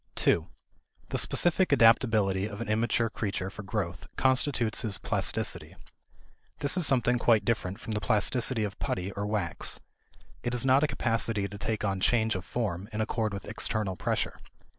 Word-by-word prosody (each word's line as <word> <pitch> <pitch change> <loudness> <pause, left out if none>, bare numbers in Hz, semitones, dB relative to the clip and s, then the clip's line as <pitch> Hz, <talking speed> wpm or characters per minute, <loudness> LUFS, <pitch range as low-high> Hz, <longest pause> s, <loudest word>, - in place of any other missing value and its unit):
2. 80 +1 +2 0.6
The - - -2
specific 175 +1 +3
adaptability 110 -6 +4
of 100 -2 -8
an - - -4
immature 115 +2 +1
creature 100 -4 -3
for 105 - -8
growth 95 -4 -4
constitutes 130 -4 +2
his 105 -4 +1
plasticity. - - -2 0.8
This 140 +3 +1
is 180 -5 +4
something 125 -2 +2
quite 110 -3 +3
different 100 -3 -1
from 115 - -7
the 105 -1 -2
plasticity 115 +2 +1
of 100 -1 -5
putty 95 +1 -2
or 100 +1 -4
wax. 105 -7 0 0.6
It 120 0 -2
is 120 - +1
not 135 +1 +5
a - - +3
capacity 115 -5 0
to 100 +1 -9
take 110 -1 -2
on 95 -1 -1
change 110 +2 +2
of 95 - -4
form 100 -4 -3
in 105 - -4
accord 110 0 -1
with 100 -1 -6
external 105 -2 -1
pressure. - - -2
110 Hz, 165 wpm, -28 LUFS, 100-120 Hz, 0.8 s, not